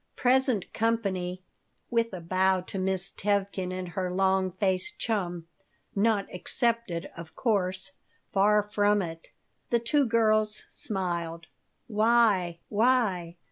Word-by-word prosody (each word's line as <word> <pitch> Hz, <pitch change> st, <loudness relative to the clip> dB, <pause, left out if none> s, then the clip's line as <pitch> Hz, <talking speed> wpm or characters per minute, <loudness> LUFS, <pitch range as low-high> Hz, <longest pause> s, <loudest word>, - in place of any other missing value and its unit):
Present 255 Hz, -5 st, +2 dB
company" 190 Hz, -5 st, -1 dB, 0.5 s
with 230 Hz, -1 st, +1 dB
a 185 Hz, -3 st, -6 dB
bow 185 Hz, +2 st, +2 dB
to 190 Hz, +1 st, -6 dB
Miss 190 Hz, 0 st, -1 dB
Tevkin 200 Hz, -2 st, -1 dB
and 185 Hz, -1 st, -4 dB
her 185 Hz, 0 st, -2 dB
long 190 Hz, 0 st, +2 dB
faced 190 Hz, -1 st, 0 dB
chum 180 Hz, -7 st, -2 dB, 0.5 s
"not 205 Hz, -1 st, +2 dB
excepted, 225 Hz, -2 st, -1 dB
of 165 Hz, -1 st, -10 dB
course. 190 Hz, -4 st, 0 dB, 0.4 s
Far 210 Hz, +1 st, +4 dB
from 205 Hz, -1 st, +2 dB
it." 165 Hz, -1 st, -8 dB, 0.4 s
The 240 Hz, -, +3 dB
two 260 Hz, +4 st, +2 dB
girls 215 Hz, -2 st, +2 dB
smiled 170 Hz, -4 st, -3 dB, 0.4 s
"Why! 210 Hz, -6 st, +2 dB
Why! 205 Hz, -7 st, +1 dB
195 Hz, 115 wpm, -28 LUFS, 180-220 Hz, 0.5 s, Far